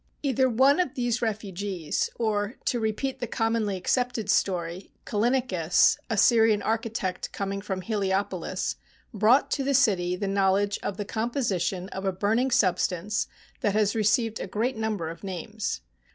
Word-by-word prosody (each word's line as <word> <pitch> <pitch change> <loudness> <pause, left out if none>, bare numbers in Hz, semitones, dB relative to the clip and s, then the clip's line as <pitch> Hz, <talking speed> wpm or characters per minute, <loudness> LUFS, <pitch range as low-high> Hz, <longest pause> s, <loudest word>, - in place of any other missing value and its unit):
Either 265 -2 +2
one 265 +6 +4
of 355 -8 0
these 245 -1 0
refugees, 200 -6 -2
or, 215 0 -1
to 240 - +1
repeat 225 +5 -2
the 245 - -3
com 225 -1 0
monly 210 -4 0
accepted 240 0 0
story, 180 -1 -1 0.2
Callinicus, 210 -7 +2
a 225 - -1
Syrian 220 -1 +4
architect 225 -4 -2
coming 200 0 -3
from 190 -2 -4
Heliopolis, 190 -3 -1 0.4
brought 220 +6 +4
to 275 - 0
the 275 +1 +1
city 180 -8 +3
the 200 +2 -3
knowledge 195 +1 +2
of 200 - -4
the 205 - -3
composition 205 -6 -1
of 190 - -6
a 195 - +1
burning 220 +7 +1
sub 190 -7 +3
stance 195 +4 -1 0.3
that 205 -1 0
has 210 -1 +2
received 225 +1 +1
a - - -4
great 230 +7 -1
number 220 -6 -2
of 165 +4 -8
names. 195 - -4
210 Hz, 155 wpm, -26 LUFS, 190-230 Hz, 0.4 s, one